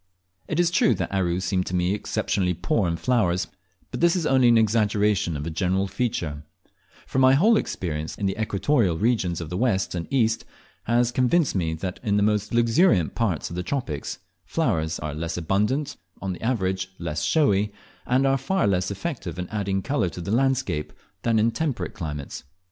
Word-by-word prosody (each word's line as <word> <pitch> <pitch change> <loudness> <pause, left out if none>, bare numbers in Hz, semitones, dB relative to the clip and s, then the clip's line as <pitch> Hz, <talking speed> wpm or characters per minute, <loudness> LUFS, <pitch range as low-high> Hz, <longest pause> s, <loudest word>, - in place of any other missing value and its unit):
It 160 - -2
is 175 -1 +3
true 220 +5 +3
that - - -3
Aru 90 -2 +1
seemed 90 0 -1
to 90 - -2
me 90 +1 +1
exceptionally 95 -3 -1
poor 115 - 0
in 85 0 -1
flowers, 95 -6 +1 0.5
but - - -4
this 170 +1 +4
is 175 -4 -1
only 130 -3 +4
an 120 -1 +6
exaggeration 105 -6 +2
of 70 - -5
a 85 - -3
general 95 +4 0
tropical 95 - -11
feature; 85 - -2 0.6
for 130 - -1
my 130 0 +6
whole 215 +11 +5
experience 80 - -3
in 100 - -2
the 95 - 0
equatorial 105 - +1
regions 100 -6 +1
of 85 -1 -6
the 90 - -2
west 110 -5 +1
and 85 -2 -4
the 135 - -1
east 115 -2 +2 0.4
has 120 +1 +2
convinced 130 +5 +2
me, 80 -4 -1
that 90 +3 -5
in 105 -4 +1
the 105 - +3
most 105 -1 +1
luxuriant 115 - +3
parts 105 -10 -1
of - - -5
the 90 - -2
tropics, 90 - -3 0.3
flowers 85 - 0
are 75 -1 -5
less 80 +3 -4
abundant, 105 - 0 0.2
on 95 -1 -3
the - - -10
average 95 -6 -1
less 75 -3 -3
showy, 105 - +2 0.4
and 130 +2 +3
are 135 0 +2
far 190 +6 0
less 95 -2 +1
effective 100 - -5
in 90 0 -4
adding 100 -2 -1
colour 140 -10 0
to 90 - -9
the 90 +3 -4
landscape 130 - 0 0.3
than 115 -1 +2
in 110 +2 +3
temperate 140 +1 -2
climates. 75 -8 -6
100 Hz, 195 wpm, -24 LUFS, 90-125 Hz, 0.6 s, an